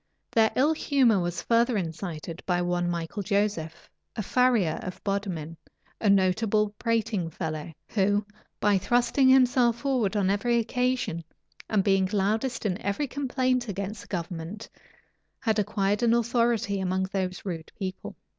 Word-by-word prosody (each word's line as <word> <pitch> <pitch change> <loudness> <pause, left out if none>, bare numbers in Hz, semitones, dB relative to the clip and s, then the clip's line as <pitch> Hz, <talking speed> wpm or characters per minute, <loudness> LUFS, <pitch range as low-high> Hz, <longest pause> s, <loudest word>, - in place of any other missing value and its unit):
Their 220 -1 +4
ill 290 +5 +3
humor 265 -9 +3
was 175 -1 -3
further 235 0 +2
incited 165 -2 -5
by 180 -1 +2
one 175 0 0
Michael 170 +4 -3
Joseph, 200 -5 -1 0.3
a 215 - -2
farrier 230 -8 +2
of 185 - -6
Bodmin, 185 -6 -3 0.4
a 210 - +2
notable 200 +2 +3
prating 225 -6 0
fellow, 160 -1 -5 0.2
who, 205 0 +1 0.3
by 205 -2 +3
thrusting 245 +6 +3
himself 250 -2 +4
forward 245 -7 0
on 195 -1 +2
every 235 +4 +1
occasion, 250 -7 -1 0.5
and 210 -3 +2
being 195 -2 +2
loudest 220 +5 0
in 195 0 -1
every 200 +9 -1
complaint 255 -2 0
against 200 +2 -4
the - - -14
government, 175 +3 -5 0.7
had 220 -3 +1
acquired 205 +1 0
an 235 -1 +4
authority 235 -3 +1
among 190 0 0
those 190 -1 -3
rude 165 -4 -5
people. 190 -1 -5
205 Hz, 140 wpm, -27 LUFS, 185-235 Hz, 0.7 s, Their